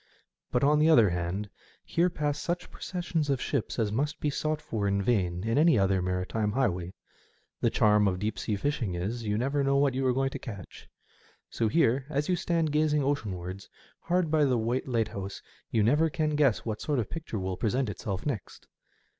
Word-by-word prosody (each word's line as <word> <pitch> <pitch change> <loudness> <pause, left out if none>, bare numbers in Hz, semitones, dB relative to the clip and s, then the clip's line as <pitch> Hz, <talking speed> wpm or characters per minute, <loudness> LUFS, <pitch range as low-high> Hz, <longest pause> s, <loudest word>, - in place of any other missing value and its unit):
But, 125 - +1
on 150 +2 +4
the 155 +1 +4
other 115 - +6
hand, 90 +4 -3 0.3
here 175 +2 +2
pass 150 -3 -2
such 175 +3 -3
processions 170 -4 -3
of 135 -2 +1
ships 135 -4 -2
as 110 -3 0
must 145 +7 -1
be 150 - 0
sought 155 +1 -1
for 105 -8 -2
in 100 0 +1
vain 90 -6 0
in 115 +5 +1
any 160 -4 +5
other 95 -1 +2
maritime 95 +4 -1
highway. 90 -9 -1 0.6
The - - +2
charm 105 -1 +4
of 90 -2 0
deep 105 +3 -3
sea 105 - -1
fishing 115 -5 -1
is, 110 +7 -3
you 105 0 0
never 140 +4 0
know 140 0 +2
what 140 -1 +3
you 135 +1 -1
are 125 - +3
going 135 +1 0
to - - -5
catch. 100 -7 -9 0.6
So 115 - 0
here, 135 0 +2
as 150 +1 -1
you 180 - +3
stand 170 -3 0
gazing 150 -1 +2
oceanwards, 100 -9 -3 0.3
hard 175 -2 0
by 155 -1 +4
the 130 -4 +3
white 120 +4 -1
Lighthouse, 110 -5 -2 0.3
you 110 - +2
never 150 +9 +3
can 155 0 -1
guess 140 -7 +2
what 110 -2 -3
sort 150 -2 -1
of 115 - 0
picture 160 -8 -5
will 95 -1 -2
present 125 +6 0
itself 100 -1 -4
next. 125 -10 -5
125 Hz, 195 wpm, -28 LUFS, 105-150 Hz, 0.6 s, other